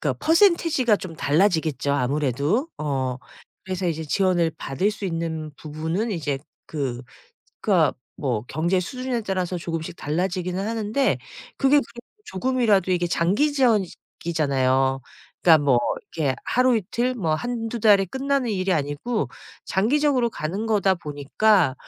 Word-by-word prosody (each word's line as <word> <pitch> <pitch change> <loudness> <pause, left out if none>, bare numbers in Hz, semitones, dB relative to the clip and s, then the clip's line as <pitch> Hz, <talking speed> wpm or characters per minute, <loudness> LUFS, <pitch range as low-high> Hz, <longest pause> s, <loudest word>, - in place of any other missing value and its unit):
그니까 - - 0
퍼센티지가 330 - +4
좀 180 -4 -8
달라지겠죠 155 -4 +1
아무래도. 145 - 0
어 130 -4 -2 0.5
그래서 185 -1 -3
이제 160 -1 -3
지원을 175 0 +1
받을 140 +10 0
수 210 - -7
있는 165 -3 -3
부분은 160 +9 -3
이제 145 -5 -2 0.3
그 130 -5 -3 0.6
그러니까 170 -9 +3 0.2
뭐 120 -6 -2
경제 170 +4 +1
수준에 250 +5 -3
따라서 185 -3 -2
조금씩 165 -1 -4
달라지기는 180 +4 -2
하는데 225 +4 0 0.4
그게 275 +1 +4
그래도 240 - -8
조금이라도 215 -3 +1
이게 175 -1 +1
장기 200 - +2
지원이잖아요. 150 - +1 0.4
그러니까 160 -4 +6
뭐 130 -4 +4 0.4
이렇게 140 -5 0
하루 250 0 +3
이틀 240 +5 -1
뭐 165 -10 0
1-2 235 +2 -3
달에 205 -3 +5
끝나는 265 +3 -1
일이 190 -2 0
아니고 145 - -1 0.4
장기적으로 255 +4 +2
가는 190 +5 -4
거다 200 -3 +3
보니까 155 +1 +1
185 Hz, 320 characters per minute, -24 LUFS, 155-230 Hz, 0.6 s, 그러니까